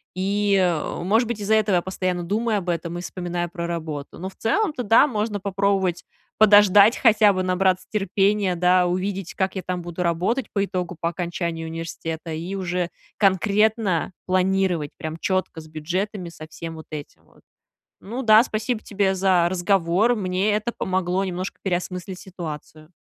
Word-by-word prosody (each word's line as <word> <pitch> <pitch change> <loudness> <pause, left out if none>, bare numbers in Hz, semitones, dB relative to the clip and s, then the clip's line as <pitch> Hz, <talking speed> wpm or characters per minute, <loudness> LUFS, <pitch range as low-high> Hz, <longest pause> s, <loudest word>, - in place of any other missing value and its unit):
И, 200 +2 +1
э, 175 -3 0
может 220 +6 +2
быть, 220 -3 -4
из-за 215 +2 +2
этого 210 -3 +2
я 175 - +3
постоянно 185 -1 -2
думаю 215 +3 0
об 180 -1 -6
этом 170 0 -2
и - - -5
вспоминаю 175 -1 -4
про 170 0 -5
работу. 155 -4 -5
Но 190 +2 -5
в - - -19
целом-то, 295 - 0
да, 225 +7 +5
можно 210 -4 -2
попробовать 195 -2 0 0.3
подождать, 205 0 +7
хотя 215 -3 +5
бы 185 0 -1
набраться 185 0 +1
терпения, 200 -1 +1
да, 180 +1 +3
увидеть, 185 0 -2
как 190 0 -1
я - - -2
там 180 -1 -4
буду 175 +1 -4
работать 180 +10 0
по 200 - +1
итогу, 180 -3 -3
по 170 - 0
окончании 170 -1 -3
университета, 165 0 -5
и 175 +5 -4
уже 180 -2 -2 0.3
конкретно 200 -1 +2
планировать, 185 -4 +1
прям 160 +1 -5
четко, 185 -2 -1
с 155 - -14
бюджетами, 180 +4 -3
со 155 -1 -11
всем 165 +1 -8
вот 160 - -11
этим 150 -1 -8
вот. - - -24 0.6
Ну 240 +6 -5
да, 220 -1 +7
спасибо 220 0 -2
тебе 200 -2 0
за 185 -2 +3
разговор. 185 +4 +2
Мне 190 +1 0
это 215 +3 -1
помогло 185 0 0
немножко 185 +1 -5
переосмыслить 180 0 -3
ситуацию. 160 -3 -9
185 Hz, 165 wpm, -23 LUFS, 175-205 Hz, 0.6 s, подождать